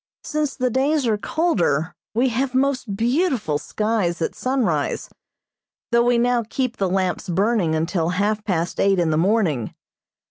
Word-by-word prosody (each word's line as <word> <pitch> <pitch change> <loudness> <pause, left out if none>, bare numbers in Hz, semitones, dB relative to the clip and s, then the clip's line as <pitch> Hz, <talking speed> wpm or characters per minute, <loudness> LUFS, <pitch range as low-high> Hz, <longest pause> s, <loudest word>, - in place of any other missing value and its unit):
Since 305 -2 -2
the 255 -1 0
days 275 +3 +1
are 225 -2 +2
colder 180 - 0 0.2
we 250 +3 +3
have 255 +2 -1
most 260 -6 0
beautiful 240 - +1
skies 210 -5 -1
at 165 - -1
sunrise, 255 -3 -1 0.8
though 235 0 +4
we 245 0 +3
now 240 0 +2
keep 255 -3 -2
the 195 -2 0
lamps 185 0 -1
burning 190 -2 +1
until 165 +1 0
half 205 +4 0
past 175 -4 -2
eight 195 -1 +3
in 170 -3 +1
the - - +1
morning. 170 - +1
215 Hz, 150 wpm, -22 LUFS, 175-255 Hz, 0.8 s, though